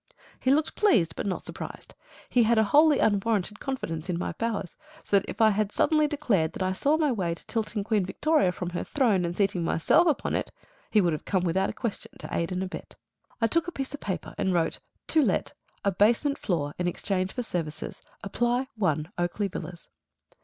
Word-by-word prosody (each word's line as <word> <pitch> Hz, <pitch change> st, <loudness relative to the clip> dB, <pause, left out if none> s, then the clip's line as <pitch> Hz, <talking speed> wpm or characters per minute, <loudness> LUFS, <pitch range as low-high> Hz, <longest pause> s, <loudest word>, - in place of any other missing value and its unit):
He 260 Hz, -, 0 dB
looked 300 Hz, +3 st, +2 dB
pleased, 220 Hz, -, +3 dB
but -, -, -3 dB
not 190 Hz, -, -2 dB
surprised. -, -, -7 dB, 0.3 s
He 245 Hz, -, +3 dB
had 230 Hz, 0 st, +4 dB
a 220 Hz, -, +6 dB
wholly 295 Hz, +7 st, +5 dB
unwarranted 210 Hz, -1 st, +1 dB
confidence 175 Hz, -, -4 dB
in 175 Hz, -, 0 dB
my 180 Hz, -, -2 dB
powers; 225 Hz, -6 st, -3 dB, 0.3 s
so 200 Hz, -, +3 dB
that 195 Hz, -, -10 dB
if -, -, -7 dB
I 220 Hz, -1 st, +7 dB
had 210 Hz, 0 st, 0 dB
suddenly 305 Hz, +4 st, +3 dB
declared 230 Hz, -, 0 dB
that -, -, -3 dB
I 185 Hz, 0 st, 0 dB
saw 290 Hz, +10 st, +2 dB
my 305 Hz, -3 st, +2 dB
way 180 Hz, -7 st, -1 dB
to -, -, -17 dB
tilting 220 Hz, -2 st, -2 dB
Queen 210 Hz, -2 st, +1 dB
Victoria 295 Hz, -, +2 dB
from 180 Hz, 0 st, -5 dB
her 175 Hz, -, -3 dB
throne 225 Hz, -10 st, +2 dB
and 170 Hz, 0 st, -3 dB
seating 195 Hz, -3 st, +1 dB
myself 305 Hz, -, +3 dB
upon 310 Hz, -, 0 dB
it, -, -, -1 dB, 0.4 s
he 215 Hz, -, +4 dB
would 175 Hz, -3 st, +2 dB
have 155 Hz, -, -5 dB
come 185 Hz, -3 st, +1 dB
without 190 Hz, +3 st, +1 dB
a -, -, -4 dB
question 230 Hz, -5 st, -5 dB
to -, -, -6 dB
aid 170 Hz, +1 st, -1 dB
and 185 Hz, +1 st, -1 dB
abet. 185 Hz, -, -7 dB, 0.4 s
I 225 Hz, -, +3 dB
took 335 Hz, +8 st, +1 dB
a -, -, -3 dB
piece 270 Hz, -4 st, -5 dB
of 290 Hz, -, -5 dB
paper 180 Hz, -5 st, -4 dB
and 190 Hz, -1 st, +1 dB
wrote, 165 Hz, -1 st, 0 dB, 0.3 s
"To 315 Hz, -, +4 dB
Let. 225 Hz, -10 st, 0 dB, 0.3 s
A 200 Hz, -, +3 dB
basement 230 Hz, +9 st, +2 dB
floor, 150 Hz, -7 st, -1 dB
in 180 Hz, -, 0 dB
exchange 185 Hz, +1 st, -1 dB
for 250 Hz, -, -3 dB
services. 165 Hz, -8 st, -4 dB, 0.2 s
Apply 240 Hz, +6 st, 0 dB
1 160 Hz, -4 st, 0 dB
Oakley 185 Hz, +4 st, -1 dB
Villas." 175 Hz, -1 st, -7 dB
200 Hz, 210 wpm, -27 LUFS, 180-250 Hz, 0.4 s, I